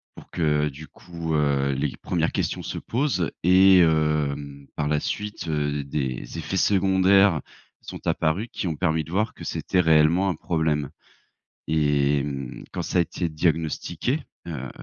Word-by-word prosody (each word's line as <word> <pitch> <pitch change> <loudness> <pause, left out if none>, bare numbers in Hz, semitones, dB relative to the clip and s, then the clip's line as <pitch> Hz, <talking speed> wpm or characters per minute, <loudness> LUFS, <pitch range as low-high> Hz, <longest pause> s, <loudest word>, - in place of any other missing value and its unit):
pour - - -14
que, 75 -3 +1
du 75 +3 -11
coup, 85 -2 -6
heu, 70 -2 +1
les 70 0 -2
1res - - -1
questions - - -2
se - - -5
posent. 120 - -1
Et 95 +1 +7
hem, 75 -3 +1
par 75 -1 -1
la 75 0 +1
suite, 105 -3 -4
heu, 75 -2 -1
des 65 0 -4
effets 90 +3 -4
secondaires 95 -2 +4 0.4
sont - - -9
apparus, 85 +9 0
qui 95 - -3
ont 80 - -2
permis 80 -2 0
de 80 - -12
voir 105 +4 0
que - - -11
c'était 90 - 0
réellement 80 +4 +4
un 90 - -1
problème. 80 -4 -1 0.8
Et 75 -2 +2
mmh, 70 -3 -6
quand - - -3
ça - - -1
a - - +6
été 85 +1 -3
diagnostiqué, 80 - -1 0.3
heu, 65 -6 -5
80 Hz, 160 wpm, -24 LUFS, 75-90 Hz, 0.8 s, Et